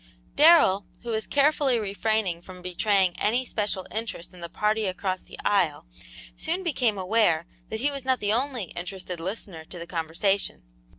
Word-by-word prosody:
Darrell, 295 Hz, -, +6 dB, 0.2 s
who 240 Hz, -, -4 dB
was 220 Hz, -1 st, -2 dB
carefully 285 Hz, -3 st, +3 dB
refraining 205 Hz, -3 st, -1 dB
from 180 Hz, 0 st, -12 dB
betraying 185 Hz, 0 st, +2 dB
any 240 Hz, +5 st, +1 dB
special 205 Hz, -5 st, -2 dB
interest 215 Hz, -5 st, -4 dB
in 180 Hz, -, -13 dB
the 170 Hz, -, -5 dB
party 215 Hz, +3 st, 0 dB
across 185 Hz, 0 st, -2 dB
the -, -, -13 dB
aisle, 170 Hz, -, +2 dB, 0.5 s
soon 360 Hz, +4 st, -2 dB
became 250 Hz, -, +1 dB
aware 185 Hz, -4 st, +2 dB, 0.2 s
that 220 Hz, +1 st, -3 dB
he 285 Hz, +2 st, +2 dB
was 275 Hz, -2 st, -5 dB
not 260 Hz, -1 st, +1 dB
the 205 Hz, 0 st, +1 dB
only 245 Hz, -, -1 dB
interested 180 Hz, 0 st, -5 dB
listener 185 Hz, -2 st, -5 dB
to 175 Hz, -, -9 dB
the 170 Hz, -, -6 dB
conversation. 170 Hz, -, -1 dB
205 Hz, 165 wpm, -26 LUFS, 180-230 Hz, 0.5 s, Darrell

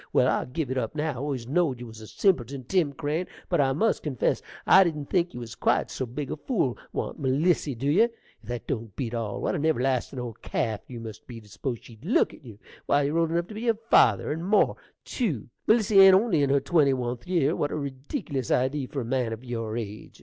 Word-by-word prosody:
Well, -, -, +4 dB
I'll -, -, 0 dB
give 130 Hz, +1 st, -3 dB
it 130 Hz, -, 0 dB
up 115 Hz, +3 st, -4 dB
now! 155 Hz, +1 st, 0 dB
I -, -, -8 dB
always 135 Hz, -3 st, -3 dB
knowed 145 Hz, -3 st, +1 dB
you 120 Hz, -, -7 dB
was 110 Hz, -1 st, -11 dB
a 110 Hz, -, -10 dB
simpleton, 135 Hz, -, 0 dB
Tim 160 Hz, +2 st, +1 dB
Crane, 150 Hz, +5 st, -2 dB, 0.2 s
but, 175 Hz, -5 st, +3 dB
I 135 Hz, -1 st, +2 dB
must 215 Hz, +11 st, +1 dB
confess, 135 Hz, -6 st, 0 dB, 0.2 s
I 195 Hz, -, +8 dB
didn't 150 Hz, -5 st, -3 dB
think 175 Hz, -2 st, +2 dB
you -, -, -5 dB
was 115 Hz, -2 st, -7 dB
quite -, -, +1 dB
so 130 Hz, -, -3 dB
big 135 Hz, +4 st, -5 dB
a -, -, -3 dB
fool. 150 Hz, -, 0 dB, 0.2 s
Want -, -, -4 dB
Melissy, 145 Hz, +1 st, +1 dB
dew 135 Hz, +5 st, 0 dB
ye? 195 Hz, +9 st, +5 dB
If 235 Hz, -, -6 dB, 0.3 s
that 120 Hz, +1 st, -5 dB
don't 115 Hz, -6 st, -4 dB
beat 120 Hz, -4 st, -3 dB
all! 110 Hz, -4 st, -3 dB
What -, -, 0 dB
an 145 Hz, -, -2 dB
everlastin' 135 Hz, -4 st, 0 dB
old 120 Hz, -3 st, -6 dB
calf 110 Hz, -3 st, -2 dB
you 120 Hz, -2 st, -8 dB
must 110 Hz, -2 st, -9 dB
be, 120 Hz, -2 st, -8 dB
to 105 Hz, -, -17 dB
s'pose 120 Hz, +4 st, -4 dB
she'd 115 Hz, 0 st, -15 dB
look 195 Hz, +9 st, +2 dB
at -, -, -15 dB
you! 115 Hz, -6 st, -11 dB, 0.3 s
Why, 145 Hz, 0 st, +3 dB
you're 150 Hz, +4 st, +1 dB
old 165 Hz, -1 st, +2 dB
enough 170 Hz, +1 st, 0 dB
to -, -, -8 dB
be 225 Hz, +3 st, -4 dB
her 225 Hz, -2 st, +3 dB
father, 105 Hz, +1 st, +5 dB
and 160 Hz, +3 st, -3 dB
more, 205 Hz, +4 st, +3 dB, 0.3 s
tew; 165 Hz, -, -2 dB, 0.2 s
Melissy 215 Hz, -3 st, +5 dB
ain't 195 Hz, -1 st, +9 dB
only 190 Hz, -6 st, +3 dB
in 140 Hz, -, +2 dB
her 140 Hz, +1 st, +4 dB
twenty 140 Hz, -1 st, +3 dB
oneth 120 Hz, -2 st, -4 dB
year. 170 Hz, -3 st, +2 dB
What 145 Hz, -, -1 dB
a -, -, -2 dB
reedickilous 140 Hz, -, -4 dB
idee 130 Hz, +2 st, +1 dB
for 135 Hz, -, -4 dB
a -, -, -5 dB
man 125 Hz, -1 st, 0 dB
o' 115 Hz, -, -3 dB
your 115 Hz, -3 st, -4 dB
age! 110 Hz, -2 st, -7 dB
135 Hz, 240 wpm, -26 LUFS, 120-165 Hz, 0.3 s, ain't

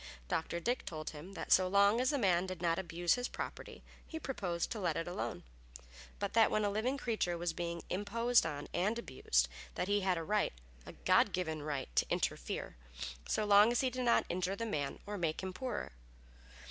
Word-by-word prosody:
Dr. 165 Hz, +1 st, -1 dB
Dick 245 Hz, +8 st, -1 dB
told 155 Hz, -2 st, -5 dB
him 160 Hz, +6 st, -10 dB
that -, -, -6 dB
so 185 Hz, -1 st, +6 dB
long 200 Hz, +4 st, +4 dB
as 255 Hz, -, +2 dB
a 290 Hz, -, +1 dB
man 190 Hz, -6 st, +2 dB
did 185 Hz, -1 st, -5 dB
not 170 Hz, 0 st, +1 dB
abuse 175 Hz, -1 st, +1 dB
his 245 Hz, 0 st, -1 dB
property, -, -, -7 dB, 0.2 s
he 320 Hz, -, -5 dB
proposed 180 Hz, -, -2 dB
to 225 Hz, -, -3 dB
let 175 Hz, -5 st, 0 dB
it 165 Hz, -, -2 dB
alone; 115 Hz, -, -4 dB, 0.7 s
but 200 Hz, -1 st, -3 dB
that 225 Hz, -1 st, +6 dB
when 215 Hz, -1 st, +1 dB
a 205 Hz, -, +1 dB
living 235 Hz, +7 st, 0 dB
creature 215 Hz, -9 st, -1 dB
was 170 Hz, -1 st, -1 dB
being 170 Hz, 0 st, -4 dB
imposed 230 Hz, +5 st, +2 dB
on 145 Hz, -3 st, -4 dB
and 205 Hz, +6 st, +1 dB
abused, 420 Hz, -, +1 dB, 0.3 s
that 180 Hz, -, -1 dB
he 205 Hz, 0 st, +2 dB
had 185 Hz, -2 st, +1 dB
a 165 Hz, -, -2 dB
right 210 Hz, +5 st, +1 dB, 0.3 s
a -, -, -8 dB
God -, -, +3 dB
given 160 Hz, -4 st, -2 dB
right 145 Hz, -, -4 dB
to -, -, +2 dB
interfere, -, -, -2 dB, 0.5 s
so 215 Hz, -, +1 dB
long 205 Hz, +2 st, +7 dB
as 240 Hz, -, +2 dB
he 260 Hz, -1 st, +1 dB
did 255 Hz, +1 st, -2 dB
not 235 Hz, -, +4 dB
injure 185 Hz, +2 st, -1 dB
the 230 Hz, -, -3 dB
man 145 Hz, -10 st, -2 dB
or 205 Hz, -1 st, -4 dB
make 165 Hz, 0 st, -1 dB
him 185 Hz, 0 st, -3 dB
poorer. 250 Hz, +3 st, -4 dB
190 Hz, 205 wpm, -34 LUFS, 170-225 Hz, 0.7 s, long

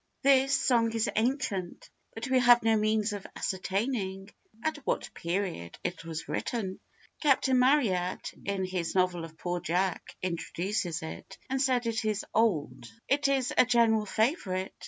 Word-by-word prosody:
[THIS 270 Hz, 0 st, +5 dB
song 230 Hz, -3 st, +3 dB
is 225 Hz, -1 st, +1 dB
ancient, 220 Hz, -6 st, -1 dB, 0.3 s
but 225 Hz, +4 st, -4 dB
we 260 Hz, 0 st, +3 dB
have 240 Hz, -1 st, +6 dB
no 225 Hz, 0 st, +4 dB
means 215 Hz, 0 st, +1 dB
of 200 Hz, -2 st, -6 dB
ascertaining 195 Hz, 0 st, -2 dB, 0.3 s
at 315 Hz, -1 st, 0 dB
what 290 Hz, -, -3 dB
period 170 Hz, -, -3 dB
it 175 Hz, -2 st, -4 dB
was 165 Hz, -1 st, -6 dB
written. 195 Hz, -6 st, -3 dB, 0.4 s
Captain 265 Hz, -3 st, +3 dB
Marryat, 225 Hz, -10 st, +2 dB
in 195 Hz, -1 st, -1 dB
his 185 Hz, -2 st, -3 dB
novel 180 Hz, -2 st, +2 dB
of 160 Hz, -1 st, -10 dB
Poor 175 Hz, 0 st, -2 dB
Jack, 180 Hz, +2 st, -2 dB
introduces 175 Hz, -1 st, -2 dB
it, 160 Hz, -, -8 dB
and 265 Hz, 0 st, +1 dB
says 255 Hz, -3 st, +2 dB
it 225 Hz, -1 st, -1 dB
is 215 Hz, -1 st, -1 dB
old. 205 Hz, -10 st, +1 dB, 0.2 s
It 285 Hz, +1 st, +2 dB
is 270 Hz, -3 st, +1 dB
a -, -, +7 dB
general 230 Hz, -3 st, +3 dB
favourite. 195 Hz, -, 0 dB
215 Hz, 150 wpm, -29 LUFS, 185-245 Hz, 0.4 s, a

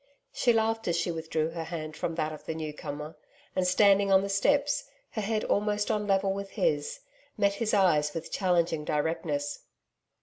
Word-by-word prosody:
She 245 Hz, -, +3 dB
laughed 225 Hz, 0 st, +1 dB
as 170 Hz, -, +1 dB
she 170 Hz, +1 st, 0 dB
withdrew 160 Hz, -1 st, -1 dB
her 165 Hz, -1 st, -5 dB
hand 155 Hz, -2 st, -5 dB
from 165 Hz, +1 st, -3 dB
that 155 Hz, -1 st, -1 dB
of 155 Hz, -, -11 dB
the 160 Hz, -, -3 dB
newcomer. 150 Hz, -1 st, -6 dB, 0.4 s
And 185 Hz, -1 st, +2 dB
standing 195 Hz, +1 st, +4 dB
on 190 Hz, 0 st, +6 dB
the 200 Hz, -, -3 dB
steps, 285 Hz, +9 st, +1 dB, 0.2 s
her 220 Hz, -, -3 dB
head 215 Hz, +1 st, -1 dB
almost 210 Hz, +1 st, +1 dB
on 210 Hz, -1 st, +1 dB
a -, -, -4 dB
level 195 Hz, -1 st, +2 dB
with 200 Hz, 0 st, -5 dB
his, -, -, 0 dB, 0.4 s
met 200 Hz, -1 st, +3 dB
his 220 Hz, +1 st, -1 dB
eyes 155 Hz, -7 st, +3 dB
with 165 Hz, 0 st, -5 dB
challenging 170 Hz, -5 st, +1 dB
directness. 150 Hz, -1 st, -1 dB
185 Hz, 180 wpm, -29 LUFS, 160-210 Hz, 0.4 s, on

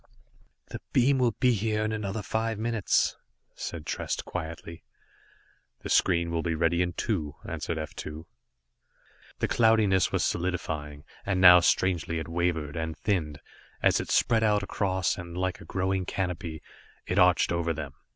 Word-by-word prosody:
"The -, -, -7 dB
beams 135 Hz, +2 st, +4 dB
will 120 Hz, -2 st, +2 dB
be 125 Hz, -1 st, +4 dB
here 110 Hz, 0 st, 0 dB
in 110 Hz, -, -1 dB
another 105 Hz, -1 st, -3 dB
five 110 Hz, +2 st, -2 dB
minutes," 110 Hz, -2 st, +1 dB, 0.4 s
said 80 Hz, -3 st, -6 dB
Trest -, -, -3 dB
quietly. 85 Hz, 0 st, -7 dB, 1.0 s
"The -, -, -5 dB
screen 85 Hz, -2 st, +3 dB
will 85 Hz, -1 st, 0 dB
be 85 Hz, -1 st, -1 dB
ready 85 Hz, +2 st, +1 dB
in 90 Hz, -1 st, -1 dB
two," 80 Hz, -8 st, -2 dB
answered 85 Hz, -, -3 dB
F 80 Hz, -1 st, -5 dB
2. 75 Hz, +2 st, -7 dB, 1.1 s
The -, -, 0 dB
cloudiness 110 Hz, -5 st, +3 dB
was -, -, +1 dB
solidifying, 80 Hz, -5 st, -3 dB, 0.2 s
and 100 Hz, -2 st, -1 dB
now 90 Hz, -1 st, +9 dB
strangely 85 Hz, -1 st, +1 dB
it 80 Hz, -, -4 dB
wavered, 85 Hz, -3 st, -1 dB
and 80 Hz, -1 st, -4 dB
thinned, 80 Hz, -8 st, -2 dB, 0.4 s
as -, -, +4 dB
it -, -, -5 dB
spread 115 Hz, -2 st, +3 dB
out 105 Hz, -2 st, +2 dB
across, 95 Hz, -3 st, -1 dB
and 85 Hz, 0 st, -8 dB
like 95 Hz, 0 st, -2 dB
a -, -, -11 dB
growing 95 Hz, 0 st, -1 dB
canopy, 85 Hz, -4 st, -4 dB, 0.4 s
it 90 Hz, -, 0 dB
arched 90 Hz, -2 st, +4 dB
over 85 Hz, -1 st, 0 dB
them. 75 Hz, -3 st, -5 dB
90 Hz, 155 wpm, -28 LUFS, 80-100 Hz, 1.1 s, now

